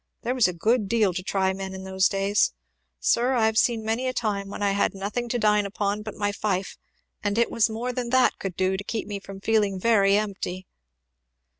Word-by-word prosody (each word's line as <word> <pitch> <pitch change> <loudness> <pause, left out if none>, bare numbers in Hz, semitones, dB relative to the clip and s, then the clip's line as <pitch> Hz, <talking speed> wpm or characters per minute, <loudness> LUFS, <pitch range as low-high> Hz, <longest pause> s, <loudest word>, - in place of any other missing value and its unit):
There 245 +1 0
was 250 -5 +4
a 180 - -3
good 215 +5 +1
deal 215 -5 +2
to 185 - -3
try 190 0 0
men 190 0 -6
in 190 - -7
those 190 0 +2
days. 195 +1 +1 0.5
Sir, 240 - +2
I 235 -3 +3
have 220 0 +1
seen 230 -3 +1
many 230 +4 -1
a 255 - -1
time 200 -3 -2
when 205 - -5
I 200 - +2
had 200 0 +1
nothing 210 +5 -3
to 245 - 0
dine 210 -2 +3
upon 205 +1 -2
but 215 -1 -7
my 205 -1 -1
fife, 200 -2 -2 0.5
and 205 0 -1
it 235 - +2
was 230 0 +2
more 235 +3 -3
than 245 -1 -3
that 255 0 +3
could 190 -3 -4
do 190 +1 +1
to 200 - -5
keep 220 +1 -3
me 205 -1 -5
from 195 0 -10
feeling 205 -3 +1
very 200 -2 +4
empty!" 195 -3 -3
205 Hz, 225 wpm, -25 LUFS, 195-225 Hz, 0.5 s, was